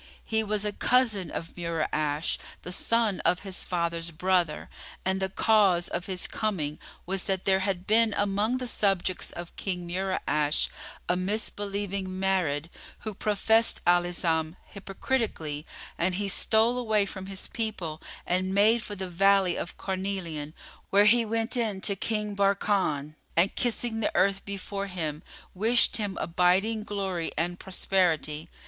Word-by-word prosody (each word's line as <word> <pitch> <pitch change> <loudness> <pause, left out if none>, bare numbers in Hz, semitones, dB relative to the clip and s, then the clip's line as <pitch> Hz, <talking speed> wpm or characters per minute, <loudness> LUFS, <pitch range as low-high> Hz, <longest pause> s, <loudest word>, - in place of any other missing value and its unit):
He 220 0 0
was 210 -1 -1
a 210 - 0
cousin 220 -5 +2
of 165 - -6
Mura'ash, 155 -2 -1 0.2
the 180 - -6
son 225 +1 +1
of 180 - +2
his 190 -2 -4
father's 170 -1 -1
brother, 175 -1 +1 0.4
and 190 +1 +1
the 190 0 -1
cause 195 -4 +3
of 180 - -4
his 185 -2 -3
coming 165 -9 -2 0.3
was 190 +1 -1
that 190 -1 -1
there 190 -1 +4
had 190 -2 -2
been 225 +2 +4
among 205 +4 +1
the 255 - -4
subjects 195 -5 0
of 175 0 -8
King 180 -3 -3
Mura'ash 170 -5 0 0.4
a 180 - +2
misbelieving 200 0 -2
Marid, 185 -5 0 0.3
who 215 - -5
professed 220 +3 +2
Al 175 0 +5
Islam 165 -2 0 0.2
hypocritically, 195 - -2 0.3
and 180 +2 +1
he 200 +1 -1
stole 220 +5 +3
away 215 -4 +2
from 190 -1 -7
his 195 0 -6
people 190 -9 -4 0.2
and 185 +2 0
made 220 +3 +5
for 205 - -7
the 190 -1 -4
Valley 190 0 +3
of 175 - -5
Carnelian, 185 -6 -4 0.3
where 200 +1 +5
he 230 +2 +5
went 225 +3 -1
in 220 -5 -1
to 200 - +1
King 210 +1 -1
Barkan 195 -7 +1 0.2
and, 180 +4 +4
kissing 235 -1 -1
the 220 - 0
earth 195 0 +2
before 200 0 -4
him, 160 -5 -3 0.3
wished 225 +5 +3
him 205 -3 -3
abiding 190 +6 +2
glory 190 -5 -2
and 175 +2 -1
prosperity. 170 -4 0
190 Hz, 145 wpm, -28 LUFS, 175-210 Hz, 0.4 s, Al